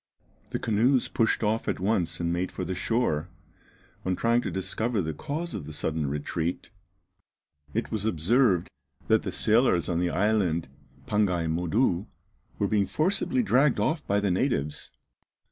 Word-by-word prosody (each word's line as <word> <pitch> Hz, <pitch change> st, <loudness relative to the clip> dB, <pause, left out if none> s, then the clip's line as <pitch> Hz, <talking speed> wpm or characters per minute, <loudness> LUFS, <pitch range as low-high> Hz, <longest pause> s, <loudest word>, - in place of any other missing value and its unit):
The -, -, -2 dB
canoes 120 Hz, +4 st, +2 dB
pushed 115 Hz, 0 st, +1 dB
off 110 Hz, +2 st, 0 dB
at -, -, -1 dB
once 90 Hz, -4 st, 0 dB
and 85 Hz, 0 st, 0 dB
made 90 Hz, +2 st, -2 dB
for 90 Hz, -, -4 dB
the 95 Hz, -, -3 dB
shore. 95 Hz, -5 st, 0 dB, 0.7 s
On 95 Hz, 0 st, 0 dB
trying 115 Hz, +3 st, +2 dB
to -, -, -3 dB
discover 110 Hz, +4 st, -1 dB
the 80 Hz, -4 st, -2 dB
cause 155 Hz, -, -4 dB
of 75 Hz, -7 st, -5 dB
this 75 Hz, -1 st, -7 dB
sudden 80 Hz, -2 st, -1 dB
retreat, 80 Hz, +4 st, -3 dB, 1.0 s
it 115 Hz, -, -1 dB
was 110 Hz, -3 st, -2 dB
observed 100 Hz, -, +2 dB, 0.4 s
that -, -, +5 dB
the -, -, -4 dB
sailors 110 Hz, -, +3 dB
on 85 Hz, -1 st, 0 dB
the 90 Hz, 0 st, +1 dB
island 90 Hz, -6 st, +1 dB, 0.4 s
Pangaï 95 Hz, -5 st, +1 dB
Modou 90 Hz, +4 st, +1 dB, 0.5 s
were 100 Hz, -, +1 dB
being 100 Hz, -1 st, +1 dB
forcibly 195 Hz, +9 st, +1 dB
dragged 140 Hz, -, +3 dB
off 155 Hz, -1 st, 0 dB
by 100 Hz, +1 st, +2 dB
the 100 Hz, -2 st, 0 dB
natives. 90 Hz, -, -1 dB
100 Hz, 155 wpm, -27 LUFS, 85-115 Hz, 1.0 s, that